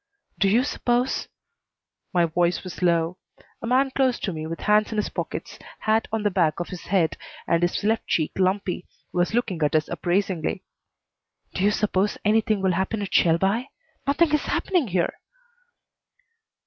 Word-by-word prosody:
"Do 195 +2 +4
you 230 +6 +4
suppose 250 -2 0 0.4
" - - -63 0.3
My 175 -1 +3
voice 175 +2 0
was 185 -1 -8
low. 170 0 +1 0.4
A 230 - -4
man 265 +2 +3
close 260 -2 +1
to 190 - -2
me, 155 0 -5
with 165 +1 -6
hands 210 +1 +3
in 220 - -3
his 210 - 0
pockets, - - -5 0.2
hat 220 +1 +2
on 220 -1 -1
the 205 - +2
back 170 -5 +1
of 175 - -4
his 180 - -7
head, 180 -4 +1 0.3
and 170 0 +2
his 175 +3 0
left 220 +2 +1
cheek 155 -2 +1
lumpy, 185 -1 0 0.3
was 180 +4 +1
looking 210 -9 -1
at 150 +1 +2
us 155 -1 +2
appraisingly. 180 -1 -1 0.9
"Do 185 - -1
you 205 - +5
suppose 205 -1 0
anything 215 -1 +2
will 190 - +3
happen 190 +4 -1
at 190 - -6
Shelby? 195 +9 +3 0.4
Nothing 305 +2 +3
is 300 - +2
happening 355 -9 +1
here." 180 -3 0
195 Hz, 170 wpm, -24 LUFS, 175-225 Hz, 0.9 s, you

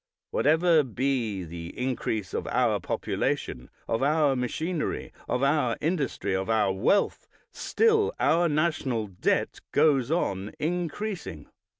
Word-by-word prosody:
Whatever 170 - +4
be 125 -6 -1
the 85 0 -8
increase 120 -5 -2
of - - -3
our - - +2
population, 60 - -2 0.2
of 115 - 0
our 145 0 +3
machinery, 155 +6 -2 0.2
of 125 +2 0
our 140 -4 +2
industry, 145 - -1
of 95 +3 -2
our 105 -4 +2
wealth, 120 - +1 0.2
still 445 -1 +2
our 170 +1 +3
national 145 -7 0
debt 95 -3 -1
goes 135 -5 +3
on 100 - -1
increasing. 175 - -3
135 Hz, 115 wpm, -27 LUFS, 110-165 Hz, 0.2 s, Whatever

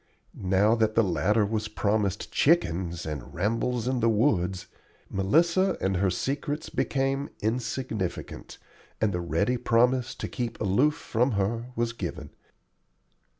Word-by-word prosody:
Now 95 +3 +2
that 110 -1 +1
the 115 - +5
latter 105 +4 +2
was 110 +1 -2
promised 105 -2 -1
chickens, 90 - +1
and 75 -3 -6
rambles 115 +6 0
in 130 -1 0
the 115 0 +3
woods, 95 -5 +1 0.5
Melissa 170 - +2
and 95 -1 0
her 95 +1 +2
secrets 145 - -3
became 135 +1 0
insignificant, 110 -4 -3 0.4
and 105 -2 +1
the 90 - -1
ready 85 +9 0
promise 125 +2 +2
to - - -5
keep 120 -2 -4
aloof 125 +10 +2
from 125 -4 0
her 110 +4 -1
was 115 0 -1
given. 85 -8 -6
110 Hz, 130 wpm, -27 LUFS, 95-125 Hz, 0.5 s, the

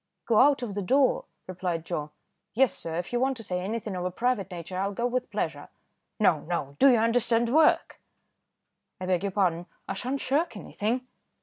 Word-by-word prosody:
"Go 225 -2 +3
out 275 -1 +5
of 220 -4 -4
the 205 - -2
door?" 265 +7 +2 0.2
replied 180 -3 -3
Joe. 155 -4 -3 0.5
"Yes 265 +1 +4
sir, 165 -1 -5
if 175 +6 -4
you 240 - +2
want 265 0 +1
to 225 - -8
say 180 -3 -2
anything 210 +1 -3
of 180 - -3
a 180 - 0
private 210 0 -1
nature, 180 0 -7
I'll 200 +1 -1
go 235 +5 -2
with 250 0 -1
pleasure." - - -3 0.5
"No! 175 -7 +4
no! 150 -4 -4
do 275 - +7
you 245 - +5
understand 230 +1 +2
work?" 315 0 +3 1.0
"I 185 - -4
beg 180 -2 +1
your 200 0 -2
pardon, 175 -3 0 0.2
I - - -2
sha'n't 255 +7 -3
shirk 280 -3 0
anything." 230 +5 -2
210 Hz, 195 wpm, -27 LUFS, 180-245 Hz, 1.0 s, do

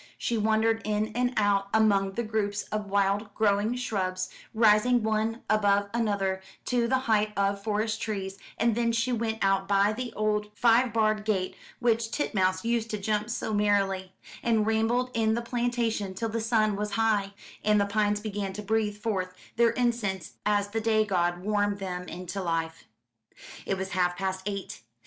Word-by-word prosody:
She 235 - -1
wandered 220 +1 +2
in 215 0 0
and 245 +2 0
out 200 -2 +2
among 200 -3 +3
the 235 - -2
groups 210 -2 -1
of 210 -1 -2
wild 200 +1 +1
growing 210 +2 +2
shrubs, 185 -7 -2 0.2
rising 225 +2 +4
one 220 +1 -1
above 205 -1 +2
another 200 -5 0 0.2
to 240 -2 +1
the 260 +2 +2
height 215 -1 +2
of 200 0 0
forest 215 +1 -1
trees, 195 -3 -4 0.2
and 235 -1 +2
then 230 +1 +1
she 230 +2 0
went 225 -2 -1
out 195 0 +2
by 200 +1 +3
the 245 +1 -4
old 210 0 0
five 240 +1 +4
barred 215 -1 +1
gate 195 -4 -1 0.2
which 230 -1 +1
Titmouse 190 -8 0
used 230 -1 0
to 215 - -2
jump 210 +2 -1
so 230 -2 -2
merrily, 195 -2 +1 0.3
and 225 -2 +2
rambled 225 +3 +1
in 220 -1 +2
the 235 - -1
plantation 235 -5 -1
till 225 +3 -2
the 230 +1 -2
sun 220 -2 +2
was 210 0 -3
high, 205 -3 +1 0.3
and 210 0 +4
the 200 - +3
pines 205 0 +1
began 205 -2 -4
to 210 +2 -6
breathe 210 0 0
forth 190 -4 -2 0.2
their 235 0 +4
incense 230 -8 -1
as 205 -1 +2
the 225 +2 -2
day 220 -1 +2
god 175 -3 0
warmed 205 0 +1
them 180 -2 -5
into 180 +3 -5
life. 165 -2 -2 0.8
It 195 - 0
was 190 0 -4
half 180 -1 0
past 190 0 -2
eight. 200 - -5
210 Hz, 170 wpm, -28 LUFS, 195-225 Hz, 0.8 s, rising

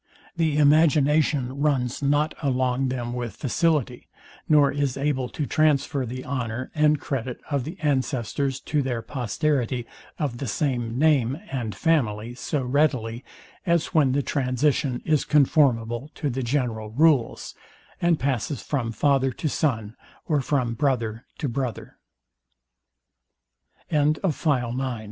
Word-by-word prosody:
The 160 -3 +1
imagination 150 -3 +3
runs 135 -5 0
not 145 +2 +2
along 130 -2 +1
them 120 -2 -3
with 120 -4 -4
facility, 140 -3 0 0.4
nor 145 -2 +5
is 140 -2 -1
able 135 -3 -1
to 150 - -3
transfer 145 -3 +1
the 130 +2 -6
honour 130 -2 -3
and 150 -1 +3
credit 130 -3 -4
of 140 -3 0
the 170 +5 -7
ancestors 135 -2 -1
to 150 -1 0
their 125 -4 -2
posterity 125 -1 -1 0.3
of 135 -6 -3
the 135 - -3
same 120 0 -1
name 140 -4 +3
and 120 -6 -3
family 120 -9 0
so 135 +3 -2
readily, 125 -3 0 0.4
as 170 -2 +1
when 145 -6 +4
the 140 +1 +1
transition 130 -1 0
is 155 -3 +2
conformable 135 -4 +2
to 145 -3 -2
the 130 +2 -3
general 120 -4 -1
rules, 140 +1 +2 0.5
and 170 -2 +3
passes 135 0 -2
from 125 -6 -2
father 135 +3 +2
to 155 - -3
son, 115 -8 -1 0.3
or 150 -3 +1
from 130 -4 0
brother 115 -4 -1
to 145 - -2
brother. 125 -2 -4 1.9
Part 150 -2 +3
II. 155 - +3
Sect, - - -15
2. 190 - +3
SECT. - - -4
X - - -15
OF - - -15
PROPERTY 130 -5 0
AND 135 - -1
RIC - - -8
135 Hz, 150 wpm, -25 LUFS, 120-150 Hz, 1.9 s, nor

